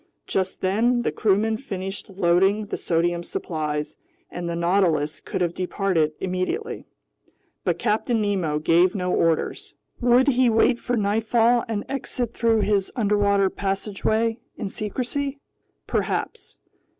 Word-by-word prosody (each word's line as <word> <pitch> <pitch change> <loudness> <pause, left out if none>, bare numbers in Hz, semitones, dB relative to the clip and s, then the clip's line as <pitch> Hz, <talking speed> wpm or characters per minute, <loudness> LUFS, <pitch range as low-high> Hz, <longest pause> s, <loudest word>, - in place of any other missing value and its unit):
Just 190 0 -2
then 235 +6 +2
the - - 0
crewmen 220 +2 +1
finished 195 -6 -6
loading 195 +3 +2
the - - -4
sodium 170 +1 0
supplies, 150 -3 -4 0.3
and 175 -1 -4
the 170 - -2
Nautilus 170 -4 +1
could - - -4
have 175 -1 +1
departed 180 -4 0
immediately. 190 - -3 0.8
But - - +1
Captain 225 +1 0
Nemo 190 -8 0
gave 170 +5 +3
no 180 -2 -1
orders. 165 -1 0 0.2
Would 245 +2 +4
he 255 -2 +3
wait 230 +2 +3
for 245 -1 -1
nightfall 225 +3 +2
and 215 -3 -3
exit 250 -3 -3
through 225 -2 +2
his 200 -2 +1
underwater 205 -3 +2
passageway 215 +3 -1 0.2
in 210 -4 -4
secrecy? 260 +7 -3 0.5
Perhaps. - - -3
200 Hz, 125 wpm, -24 LUFS, 180-230 Hz, 0.8 s, Would